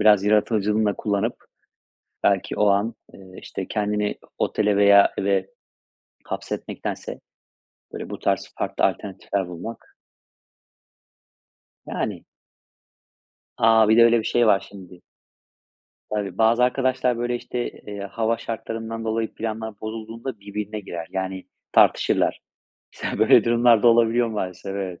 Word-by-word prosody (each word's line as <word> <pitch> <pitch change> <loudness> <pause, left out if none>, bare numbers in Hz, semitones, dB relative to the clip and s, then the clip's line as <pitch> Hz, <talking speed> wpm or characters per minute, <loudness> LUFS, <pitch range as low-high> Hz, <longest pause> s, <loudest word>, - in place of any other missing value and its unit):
biraz 105 -2 +5
yaratıcılığını 105 0 +2
da 105 - +2
kullanıp 105 +3 -2 0.8
belki - - +1
o 105 - +3
an, 100 +4 +1 0.2
eee, 95 -1 -14
işte, 95 - -6
kendini 105 -1 -1
o - - -21 0.2
otele 105 -1 +1
veya 100 0 +6
eve 95 -1 +1 0.8
hapsetmektense, - - -5 0.7
böyle, - - -6
bu - - -6
tarz - - -1
farklı - - 0
alternatifler 100 -1 -2
bulmak. 90 +6 -9 1.9
Yani. - - -4 1.3
A! 110 -1 +5
Bir 110 - +5
de 115 - +8
öyle 115 0 +5
bir 110 - -3
şey 120 +1 +2
var 100 -2 +3
şimdi. 90 -3 -13 1.1
Tabii, 100 -3 -3
bazı 115 +2 +4
arkadaşlar 125 -1 +1
böyle, 120 0 -1
işte, 120 0 -4
eee, 105 -1 -9
hava 110 +3 -1
şartlarından 115 0 -5
dolayı 110 0 -2
planlar 110 -1 -5
bozulduğunda 115 +1 -6
birbirine 105 +1 -5
girer. 85 -4 -7
Yani 95 0 -4 0.3
tartışırlar. - - +3 0.5
Mesela - - -4
böyle - - +6
durumlar 120 -1 +4
da 120 - +7
olabiliyor 115 0 +3
maalesef. 95 -3 -4
Evet. 95 -3 -5
105 Hz, 125 wpm, -23 LUFS, 100-115 Hz, 1.9 s, de